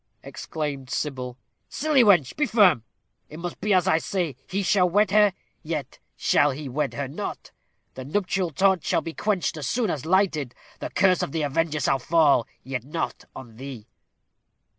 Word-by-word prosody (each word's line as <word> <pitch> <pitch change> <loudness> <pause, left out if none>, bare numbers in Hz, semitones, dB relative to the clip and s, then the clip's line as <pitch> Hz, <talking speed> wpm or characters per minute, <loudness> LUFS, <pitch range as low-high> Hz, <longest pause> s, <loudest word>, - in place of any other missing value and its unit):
exclaimed 140 -4 -5
Sybil. 125 -4 -3 0.3
"Silly 290 -2 +3
wench, 175 - +4
be 295 -2 +1
firm. 195 - +4 0.5
It 155 - -10
must 175 +1 -6
be 210 - 0
as 185 -1 +3
I 165 -3 +4
say. 170 -6 -2
He 195 +2 -2
shall 180 -1 +3
wed 205 +2 +2
her 210 -1 +5 0.3
yet 155 -5 -5 0.2
shall 145 - +3
he 145 +1 -5
wed 140 +2 -2
her 140 -1 -3
not. 135 - -6 0.4
The 130 - -7
nuptial 185 +4 -1
torch 190 +3 +2
shall - - +1
be 165 - -6
quenched 195 -5 -1
as 145 -4 -4
soon 235 -6 0
as 140 - -4
lighted; 160 -7 +1 0.2
the - - -4
curse 185 -2 +3
of - - -3
the 160 -2 -1
avenger 155 +2 0
shall 135 -1 +1
fall 145 -4 +3 0.2
yet 130 -2 -4
not 155 +5 -4
on 115 -4 -11
thee." 130 -4 -8
160 Hz, 175 wpm, -25 LUFS, 135-190 Hz, 0.5 s, her